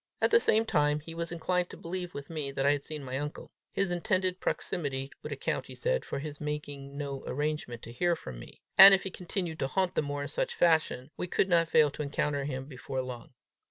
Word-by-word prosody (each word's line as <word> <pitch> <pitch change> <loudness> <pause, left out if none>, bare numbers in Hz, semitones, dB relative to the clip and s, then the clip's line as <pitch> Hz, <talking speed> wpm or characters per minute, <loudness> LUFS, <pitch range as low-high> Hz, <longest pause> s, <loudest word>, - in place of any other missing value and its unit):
At - - +2
the 460 - +7
same 225 - +3
time, 150 -5 +2
he 165 +2 -9
was 170 0 -4
inclined 180 +1 0
to - - -10
believe 180 +1 -5
with 140 +2 -7
me, 150 -4 -3
that 135 0 -1
I 140 - +6
had 145 -1 0
seen 150 0 -6
my 130 0 -3
uncle. 150 +1 -6 0.2
His 195 -2 0
intended 185 +1 +1
proximity 135 -7 -2
would - - -7
account, - - -2
he - - -9
said, - - 0
for - - -4
his 145 +1 -6
making 145 -2 -5
no 140 -2 -4
arrangement 145 -4 -3
to 115 - -8
hear 175 +8 +1
from 65 - -8
me; - - -13 0.2
and 195 0 +13
if 190 - -3
he 190 - -4
continued 175 -3 -3
to 135 - 0
haunt 185 +4 0
the - - +2
moor 145 -1 -3
in - - -4
such 145 - -2
fashion, 155 -5 +2
we 180 - -3
could 190 - +1
not 170 -2 +4
fail 155 -2 +4
to 150 - -6
encounter 145 -1 -1
him 130 -2 -4
before 130 -1 -4
long. 125 0 -8
150 Hz, 230 wpm, -30 LUFS, 140-175 Hz, 0.2 s, and